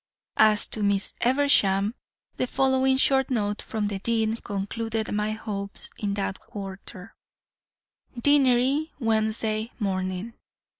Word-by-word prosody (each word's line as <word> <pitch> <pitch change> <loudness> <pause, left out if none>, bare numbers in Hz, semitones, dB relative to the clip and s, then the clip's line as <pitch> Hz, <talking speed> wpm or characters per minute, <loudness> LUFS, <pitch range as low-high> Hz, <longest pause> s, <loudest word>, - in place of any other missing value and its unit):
"As 215 -1 +5
to 215 - -3
Miss 200 -1 +1
Eversham, 230 -6 +3 0.4
the 255 - 0
following 265 0 +2
short 265 0 +3
note 210 -5 -1
from 220 -4 -3
the 205 -1 -3
dean 225 +1 +1
concluded 220 +2 -3
my 210 +1 0
hopes 200 -2 -5
in 200 -1 -1
that 195 -1 -3
quarter: 195 -1 -9 1.1
"Deanery, 275 +2 +3
Wednesday 220 -1 0
morning. 185 +1 -2
220 Hz, 110 wpm, -26 LUFS, 200-245 Hz, 1.1 s, As